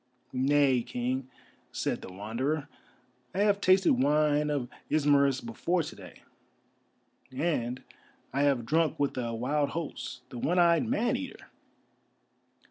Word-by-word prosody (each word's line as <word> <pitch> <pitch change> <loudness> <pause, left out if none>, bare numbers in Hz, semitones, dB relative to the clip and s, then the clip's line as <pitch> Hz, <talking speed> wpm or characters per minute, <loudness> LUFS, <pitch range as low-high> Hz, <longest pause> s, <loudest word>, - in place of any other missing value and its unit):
"Nay, 135 -1 +3
King," 125 +2 -3 0.4
said - - -2
the - - -9
Wanderer, 125 +10 -2 0.7
"I 195 - +1
have 205 -1 +3
tasted 185 -1 +5
wine 150 +1 +3
of 140 -4 -1 0.2
Ismarus 140 -3 +3
before 180 -7 0
to 155 - -8
day, - - -13 1.1
and 130 -4 -1 0.5
I 140 - +1
have 140 -5 +2
drunk 155 +4 +1
with 145 -1 0
a 120 -3 -2
wild 140 +5 0
host, 150 -5 -5
the 125 - -7
one 175 +9 0
eyed 170 +5 +4
Man 240 +1 +1
Eater!" 270 +1 -7
145 Hz, 125 wpm, -29 LUFS, 130-170 Hz, 1.1 s, tasted